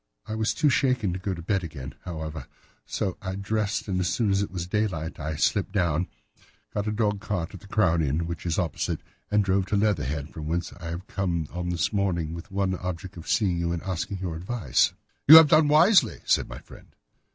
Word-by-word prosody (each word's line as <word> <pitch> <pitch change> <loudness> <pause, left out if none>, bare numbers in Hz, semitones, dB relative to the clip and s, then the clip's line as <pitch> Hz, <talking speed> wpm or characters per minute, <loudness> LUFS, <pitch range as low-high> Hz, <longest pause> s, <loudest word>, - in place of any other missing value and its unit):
I - - -5
was 110 0 0
too 150 - +3
shaken 125 -8 +1
to 95 - -4
go 95 0 -2
to 85 - -8
bed 95 +1 0
again, 70 -6 -7
however, 80 -5 -6 0.4
so 95 - -2
I 95 -1 -4
dressed, 105 +2 -1
and 95 -2 -1
as 90 -2 0
soon 110 -4 +1
as 100 0 +2
it 100 - -2
was 90 -2 -4
daylight 90 -5 -2
I 80 +1 -3
slipped 95 +6 +1
down, 85 -3 +1 0.7
got 105 +1 -2
a - - +1
dog 105 -2 0
cart 90 -5 -3
at 95 - -8
the 100 - -15
Crown 90 -6 +2
Inn, 75 +3 0
which 85 +1 -5
is 80 - 0
opposite, 85 -4 -1 0.3
and 105 -1 +3
drove 95 0 +1
to 105 - 0
Leatherhead, 80 - 0
from 75 -1 -6
whence 85 +2 -2
I 85 - -11
have 85 +3 -5
come 85 -7 -2
on 90 0 -3
this 85 +2 0
morning 85 -6 0
with 85 0 -7
the 95 - -13
one 95 -1 +1
object 90 0 -5
of 85 -1 -10
seeing 95 -6 +2
you 85 0 -1
and 85 -1 -3
asking 95 +1 -3
your 90 -3 -4
advice." 90 - +1 0.4
"You 155 - +12
have 160 -2 +10
done 155 0 +6
wisely," 170 +8 +5
said - - +2
my - - -7
friend. - - -15
95 Hz, 220 wpm, -26 LUFS, 85-105 Hz, 0.7 s, You